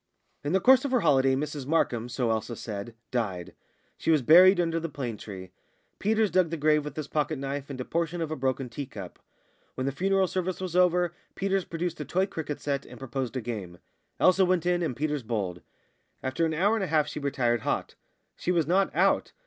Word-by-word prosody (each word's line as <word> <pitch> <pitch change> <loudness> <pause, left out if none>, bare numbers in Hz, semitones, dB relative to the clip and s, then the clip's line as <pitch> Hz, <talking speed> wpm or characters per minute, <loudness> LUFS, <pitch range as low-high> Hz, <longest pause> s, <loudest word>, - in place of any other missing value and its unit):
In 145 +4 -1
the 190 - +4
course 260 +7 +6
of 280 - -1
her 255 -2 +2
holiday 135 -4 +4
Mrs 145 -1 -4
Markham, 125 -7 +1
so 120 -1 0
Elsa 110 +2 -2
said, 105 +1 -6 0.2
died; 100 -8 -2 0.5
she - - -2
was 155 -5 +4
buried 180 +7 +8
under 165 -1 +1
the 165 0 -4
plane 125 -6 -4
tree. 95 -4 -9 0.5
Peters 215 0 +2
dug 185 -3 +3
the 165 - -3
grave 150 0 +3
with 150 -2 -7
his 155 -2 -4
pocket 155 0 -1
knife 140 +1 -4
and 135 -2 -6
a 125 - -3
portion 170 +1 -2
of 160 -2 -3
a - - -1
broken 130 -1 -1
tea 130 +3 -6
cup. 100 -8 -9 0.6
When 130 - -2
the 135 - 0
funeral 190 +6 +2
service 185 0 -2
was 185 -2 -4
over 180 -1 +3 0.2
Peters 195 -1 0
produced 170 0 -3
a - - -4
toy 185 +2 +1
cricket 160 -6 -5
set, 140 -2 -2
and - - -12
proposed 135 -1 -4
a - - -2
game. 105 -7 -6 0.4
Elsa 185 +1 +5
went 180 -2 +1
in, 175 0 +2
and 160 -7 -1
Peters 150 +1 -1
bowled. 100 -7 -3 0.6
After 145 +6 0
an 160 - -2
hour 200 +7 +3
and 220 -3 0
a - - -1
half 155 -2 +2
she - - -5
retired 120 -5 0
hot; - - -2 0.4
she 180 - -2
was 170 -3 +2
not 190 +5 +2
out. - - +2
150 Hz, 215 wpm, -27 LUFS, 130-175 Hz, 0.6 s, buried